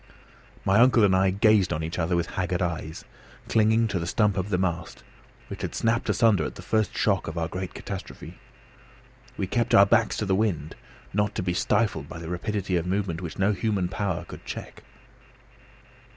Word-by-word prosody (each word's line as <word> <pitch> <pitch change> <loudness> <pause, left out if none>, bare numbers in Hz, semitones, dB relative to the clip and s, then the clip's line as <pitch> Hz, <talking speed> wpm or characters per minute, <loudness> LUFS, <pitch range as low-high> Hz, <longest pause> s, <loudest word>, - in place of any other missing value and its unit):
My 100 +3 +4
uncle 120 -2 +5
and 95 -2 +4
I 95 0 +3
gazed 100 0 +3
on 75 +1 -2
each 80 +3 -4
other 85 +1 +1
with 85 0 -1
haggard 90 -1 -1
eyes, 80 -2 -4 0.4
clinging 110 +1 +3
to 95 - -1
the 85 - -4
stump 105 +2 +2
of 95 0 -2
the 90 - +1
mast, 85 -3 -3 0.4
which - - -8
had - - -4
snapped 115 0 0
asunder 105 -4 +3
at - - -5
the - - -10
first 110 -3 0
shock - - +1
of 80 +1 -5
our 85 -1 -1
great 95 +1 -6
catastrophe. 95 -2 -8 1.0
We - - -1
kept 115 +5 +1
our 100 - +8
backs 110 +2 +2
to 105 - -1
the 95 - +1
wind, 95 -7 -1 0.4
not 105 +1 0
to 100 - -2
be 90 -1 -1
stifled 95 -5 0
by - - -7
the 80 -1 -7
rapidity 95 +1 -2
of 85 - -2
a - - -4
movement 95 -3 -1
which 85 -3 -6
no 95 +2 +2
human 105 -4 -1
power 95 -3 -2
could - - -11
check. - - -8
95 Hz, 195 wpm, -26 LUFS, 85-105 Hz, 1.0 s, our